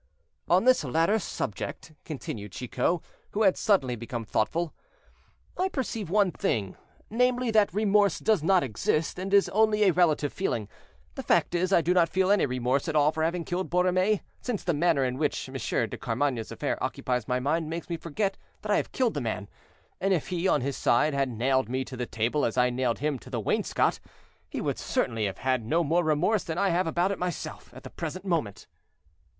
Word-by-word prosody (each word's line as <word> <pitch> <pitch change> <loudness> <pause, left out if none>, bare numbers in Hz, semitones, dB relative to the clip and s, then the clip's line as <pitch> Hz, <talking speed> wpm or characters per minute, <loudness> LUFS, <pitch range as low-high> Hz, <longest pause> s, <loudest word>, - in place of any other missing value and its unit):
"On 180 +4 +4
this 255 -7 +4
latter 165 - +2
subject," 155 - -5
continued 110 - -6
Chicot, 130 +7 -1 0.3
who 215 - +1
had 190 -3 +5
suddenly 135 - +2
become 115 0 -5
thoughtful, 160 +11 -1 0.9
"I 375 +1 +2
perceive 230 - -3
one 200 -1 +3
thing; 105 - -1 0.4
namely, 250 +1 +2
that 215 -2 +4
remorse 205 -1 +3
does 215 -6 +2
not 185 +3 +3
exist, 145 +8 -1
and 190 +1 -4
is 200 -1 +5
only 215 0 +3
a 190 -3 +4
relative 155 -5 +2
feeling; 115 - -2 0.5
the - - -5
fact - - +2
is, 180 +2 0
I 175 - +5
do 175 +2 +2
not 170 -3 +4
feel 190 +2 +2
any 205 -7 +3
remorse 125 +1 0
at 160 - -2
all 150 0 +4
for 160 - -3
having 170 +2 0
killed 180 +1 -2
Borromée, 185 +3 +2 0.2
since 240 -6 -3
the 175 - +1
manner 155 -3 +2
in 125 +1 -2
which 150 -2 -1
Monsieur - - -1
de - - -7
Carmainges' 120 -1 -1
affair - - -3
occupies 125 -3 -2
my 125 0 +1
mind 155 +4 0
makes 165 +1 -5
me 170 - -2
forget 195 +5 -2 0.2
that 210 - -2
I - - +4
have - - -2
killed 250 -4 +1
the 145 - -2
man; 110 -3 -3 0.5
and 195 0 +2
if 160 - -3
he, 180 0 0
on - - +3
his 140 +1 -2
side, 150 +5 +2
had 135 -1 +1
nailed 125 +1 +1
me 130 +1 -1
to 130 - -8
the 125 -1 -4
table 115 +7 0
as 115 - -1
I 125 0 +4
nailed 125 -1 0
him 145 -1 -1
to - - -13
the 125 -2 -2
wainscot, 105 - 0 0.5
he - - -4
would - - -2
certainly 115 -2 -1
have 95 - -5
had 130 -3 0
no 165 +10 +1
more 165 +3 +2
remorse 170 +7 +2
than 165 -1 -4
I 200 +1 +2
have 175 +1 +1
about 175 +4 +1
it 200 - -3
myself, 180 -3 -5
at - - -11
the - - -9
present 170 +3 -6
moment." 160 - -2
165 Hz, 205 wpm, -27 LUFS, 130-190 Hz, 0.9 s, had